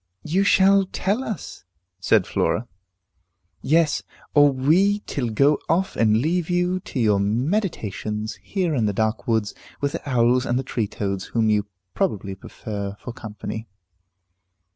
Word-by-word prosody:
"You 180 +6 +1
shall 195 0 +5
tell 205 +6 -1
us," 215 - -6 0.4
said 90 - +3
Flora. 120 - 0 0.9
"Yes, 160 +1 +2 0.3
or 145 -1 +6
we 175 +10 +3
till 125 -5 -2
go 140 +7 +3
off 185 +4 +1
and 110 -1 +3
leave 165 +7 0
you 180 +1 +1
to 140 - -6
your 105 -4 +3
meditations, 110 - -1
here 185 -5 -1
in 115 -6 +1
the 105 - 0
dark 110 +3 -1
woods, 110 -3 +1 0.3
with 140 0 0
the 145 - -6
owls 125 0 +3
and 120 -1 0
the 130 - -1
tree 120 -4 -2
toads, 100 -2 -3
whom 110 -2 +1
you 105 -1 +1 0.3
probably 100 -3 -1
prefer 100 +1 -6
for 120 - -7
company." 110 0 -7
125 Hz, 145 wpm, -23 LUFS, 110-170 Hz, 0.9 s, or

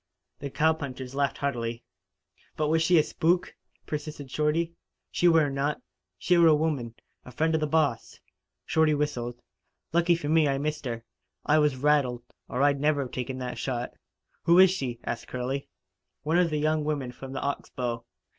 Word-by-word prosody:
The 140 - -5
cowpunchers 140 -4 -1
laughed 140 -1 0
heartily. 120 -4 -2 0.7
"But 150 -1 +1
was 160 +1 +3
she 170 +1 +4
a 155 - +6
spook?" 175 +4 0 0.3
persisted 150 -3 -6
Shorty. 160 +3 0 0.4
"She 175 - +2
were 165 -3 +5
not. 140 +2 -1 0.4
She 180 -1 +3
were 170 - +7
a 155 - +6
woman 145 -7 -1 0.3
a 125 - -11
friend 160 +5 0
of 160 - +1
the 155 - +1
boss." 145 -7 0 0.5
Shorty 160 -1 +3
whistled. 120 -5 -2 0.5
"Lucky 170 +1 +4
for 165 -3 -5
me 155 0 +4
I 135 -1 +1
missed 150 +1 -3
her. 115 -2 -4 0.4
I 155 +1 +4
was 150 -3 +3
rattled, 130 -4 +2 0.3
or 130 +3 0
I'd 145 -1 +3
never 145 -3 +1
taken 130 +1 -4
that 125 -1 -5
shot." 125 -2 -3 0.5
"Who 170 +1 +6
is 190 0 +8
she?" 125 -10 -3
asked 115 - -4
Curley. 130 +2 -3 0.5
"One 160 +4 +2
of 175 -2 +3
the 155 - -1
young 155 +1 +1
women 145 -4 -2
from 130 +2 -9
the - - -3
Ox 140 0 -3
Bow. 120 -2 -3
145 Hz, 175 wpm, -27 LUFS, 130-160 Hz, 0.7 s, is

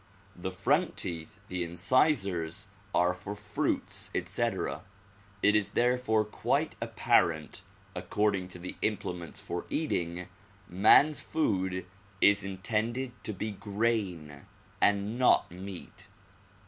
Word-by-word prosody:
The 90 +1 -4
front 95 - +1
teeth, 80 -3 -3
the 90 -1 -2
incisors, 95 - +1 0.3
are 90 0 +3
for 95 +3 -6
fruits, 105 0 -2
etc. 95 +3 -1 0.6
It 105 +1 +5
is 105 -2 +1
therefore 120 -3 +3
quite 105 - 0
apparent 80 -2 +1 0.3
according 100 -3 0
to 90 - -9
the 90 +1 -7
implements 90 -6 -3
for - - -5
eating, 85 +1 -1 0.4
man 105 - +6
's - - -3
food 95 - -1 0.3
is 100 0 +5
intended 110 +6 -2
to - - 0
be 105 +2 -3
grain 100 -8 -2 0.3
and 105 +3 +2
not 125 - +4
meat. 95 0 -9
100 Hz, 110 wpm, -30 LUFS, 90-110 Hz, 0.6 s, man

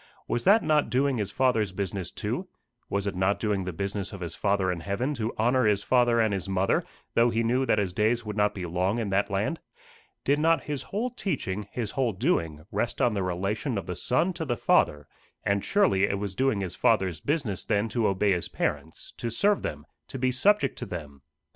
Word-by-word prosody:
Was 120 - -1
that 205 +4 +6
not 150 -1 +2
doing 135 0 +1
his 100 -2 -1
Father's 115 -4 +1
business 95 -1 -3
too? - - -4 0.4
Was 100 0 -1
it 100 - -1
not 95 +2 +1
doing 105 -4 0
the 90 - -3
business 100 +2 -3
of 100 - -8
his 85 - -4
Father 100 -2 +1
in 90 - -3
heaven 100 - -2
to 115 -3 -2
honour 125 +2 +3
his 100 -1 +2
father 120 -1 +3
and 110 -2 +2
his 95 0 -3
mother, 95 0 +1 0.3
though 120 +1 +4
he 115 0 0
knew 125 +3 +1
that - - +3
his 100 -4 0
days 115 +4 +1
would 105 -1 -4
not 105 -1 +2
be 90 -3 -4
long 90 +5 0
in 110 -4 -2
that 100 +1 +1
land? 105 +12 -1 0.6
Did 145 +1 +2
not 165 +2 +3
his 145 -2 -3
whole 230 +5 -3
teaching, 120 - -3
his 115 -4 -3
whole 125 -4 0
doing, 85 - -1
rest 120 - -1
on 120 - +3
the 100 - -1
relation 100 - -2
of 95 - -3
the 90 - -4
Son 165 - +1
to 165 - -4
the 120 -6 -2
Father 75 -6 +2 0.4
and 100 0 +1
surely 185 - +3
it 100 - -1
was 100 -1 -4
doing 130 -1 +1
his 90 -2 -4
Father's 95 -7 +2
business 140 - -1
then 105 +2 +1
to 115 -1 +1
obey 100 +1 +2
his 90 -2 -1
parents 80 - -3
to 120 - -3
serve 200 - +2
them, 75 0 -5 0.2
to - - -6
be 130 0 +1
subject 205 +12 +2
to - - -5
them. 75 -6 -7
105 Hz, 215 wpm, -27 LUFS, 95-125 Hz, 0.6 s, that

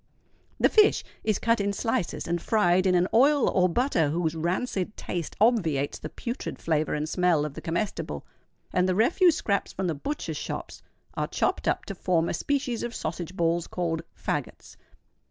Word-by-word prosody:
The - - +6
fish 425 -1 +4 0.2
is 215 -3 +1
cut 230 -1 +2
in 200 0 0
slices 225 -2 -2
and 170 0 -1
fried 185 -4 +3
in 180 - +3
an 180 +1 +3
oil 280 +4 +5
or 185 -1 +3
butter 175 - +1
whose 160 0 0
rancid 185 +5 -2
taste 170 -3 -4
obviates 175 - +2
the 155 - -6
putrid 240 - -5
flavour 155 -2 0
and 150 +1 -2
smell 175 -3 +2
of 150 - -5
the - - -8
comestible; 170 +6 -3 0.5
and 185 0 +2
the 185 - +1
refuse 320 - +4
scraps 200 -1 -1
from 190 - -3
the 170 - 0
butchers 280 - -4
shops - - -6 0.3
are - - -2
chopped - - -1
up - - 0
to 200 - -5
form 175 -3 +1
a - - -1
species 260 - -1
of 240 0 -4
sausage 175 +3 -4
balls 170 0 +1
called 165 -2 -2 0.2
"faggots." - - -4
180 Hz, 175 wpm, -27 LUFS, 165-225 Hz, 0.5 s, The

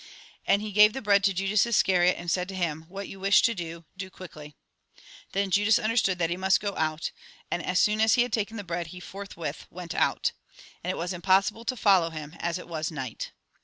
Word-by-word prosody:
And 200 +1 +3
he 215 - -5
gave 210 +1 +6
the 265 - -5
bread 200 -1 +4
to 200 - +4
Judas 195 +2 +2
Iscariot, 185 -5 +3
and 175 -1 -3
said 180 +2 -1
to 190 - -6
him: 160 -3 -2
" - - -28
What 195 +1 -6
you 195 - -10
wish 195 +1 +4
to 230 - +3
do, 170 -3 -7
do 190 0 -6
quickly." 150 -6 -11 0.8
Then 195 0 0
Judas 205 +3 +4
under 220 +1 -1
stood 195 -5 +2
that 170 -1 0
he 175 - -1
must 190 -1 +3
go 200 -1 -3
out, 155 0 -1 0.4
and 175 - -1
as 180 - -1
soon 215 +1 +3
as 220 +2 +5
he 240 - +4
had 245 - -6
taken 220 0 -1
tlie 205 - -6
bread 170 -1 -3
he 180 +2 -10
forthwith 180 -6 -7
went 175 -1 -7
out. - - +1 0.5
And 180 - -3
it 185 - -1
was 175 +2 -3
impossible 195 +5 +2
to 255 +1 -2
follow 190 -6 +4
him, 155 0 -8
as 170 +1 -1
it 180 - -10
was 155 -2 -3
night. 130 -7 -6
185 Hz, 235 wpm, -27 LUFS, 170-205 Hz, 0.8 s, gave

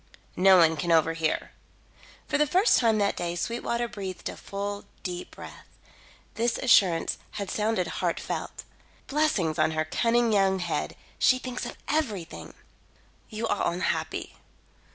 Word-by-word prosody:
"No 190 0 +6
one 160 -2 +5
can 175 +2 -1
overhear." 165 -1 +1 0.8
For 290 - 0
the 300 - +4
first 375 - +4
time 225 -3 +3
that 200 -1 +1
day 170 0 -3
Sweetwater 235 +4 -2
breathed 195 -6 -6
a - - -7
full, 200 +1 -5 0.2
deep 180 -1 -5
breath. - - -12 0.7
This 235 +1 0
assurance 190 -9 +3
had 200 -2 -4
sounded 210 -3 0
heartfelt. - - -3 0.4
"Blessings 270 - 0
on 155 - +4
her 155 - +1
cunning 230 +6 +2
young 195 -1 +3
head. 170 -5 -2 0.2
She 255 - +5
thinks 255 -1 -5
of - - -9
everything." 225 - -3 0.7
"You 220 +1 -3
are 205 - 0
unhappy. 175 +1 -2
200 Hz, 135 wpm, -27 LUFS, 175-235 Hz, 0.8 s, No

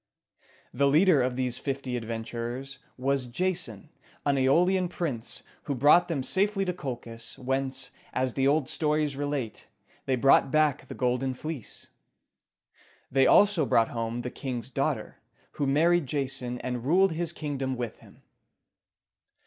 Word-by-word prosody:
The 140 - +3
leader 155 +1 +5
of 125 0 0
these 125 -1 -1
fifty 135 -2 -3
adventurers 120 +3 -5 0.2
was 135 0 0
Ja´son, 165 - -2 0.4
an 140 -1 +3
Æolian 175 +8 +3
prince, 135 -10 -4 0.2
who 140 - -2
brought 150 +7 +5
them 150 -6 -2
safely 195 +5 +2
to 180 - -1
Colchis, 115 -7 -7
whence, 135 +1 -2 0.2
as 130 -1 -1
the 135 0 +1
old 145 -1 +2
stories 150 -2 0
relate, 140 -5 -3 0.4
they 130 - +2
brought 135 +2 +5
back 155 -1 +2
the - - -7
Golden 125 +1 0
Fleece. 155 -3 -7 1.2
They 135 0 +4
also 200 -6 +5
brought 115 -3 +3
home 115 +1 -3
the 125 - -4
king's 130 -2 -5
daughter, - - -2 0.3
who 140 - -2
married 165 +2 +3
Jason, 130 -3 -2
and 125 -2 -3
ruled 185 +7 +4
his 165 0 -2
kingdom 140 -5 -3
with 120 -2 -5
him. - - -19
135 Hz, 140 wpm, -28 LUFS, 125-155 Hz, 1.2 s, leader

